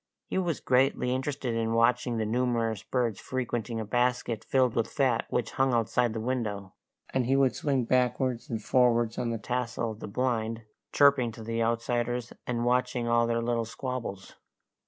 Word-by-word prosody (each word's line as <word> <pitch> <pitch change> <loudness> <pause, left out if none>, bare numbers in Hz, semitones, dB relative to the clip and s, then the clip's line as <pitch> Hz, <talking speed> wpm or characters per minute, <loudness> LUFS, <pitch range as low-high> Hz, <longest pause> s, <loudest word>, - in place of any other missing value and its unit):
He - - -1
was 175 -5 -1
greatly 125 -1 +2
interested 130 -1 -2
in 115 0 0
watching 120 +1 +2
the 110 - 0
numerous 115 -2 0
birds 120 -5 -1
frequenting 120 -3 -3
a 110 - -3
basket 120 -1 0
filled 130 -3 +2
with 115 -1 +1
fat 130 -4 +1
which 120 -2 -1
hung 130 -2 +2
outside 115 +1 +1
the 110 - -3
window, 110 -5 -3 0.4
and 130 -2 +1
he 135 - +3
would 135 -5 +3
swing 135 -4 0
backwards 125 0 0
and 115 - -2
forwards 120 -3 +2
on 120 - -1
the 115 - -1
tassel 120 0 -2
of 110 - -10
the - - -6
blind, 115 0 -1 0.3
chirping 140 -5 +4
to 115 - -9
the 115 +1 -2
outsiders, 120 +1 -1
and 120 -1 -1
watching 125 -1 +1
all 115 0 +3
their 115 0 0
little 120 -1 0
squabbles. 115 -4 -5
120 Hz, 175 wpm, -28 LUFS, 115-125 Hz, 0.4 s, chirping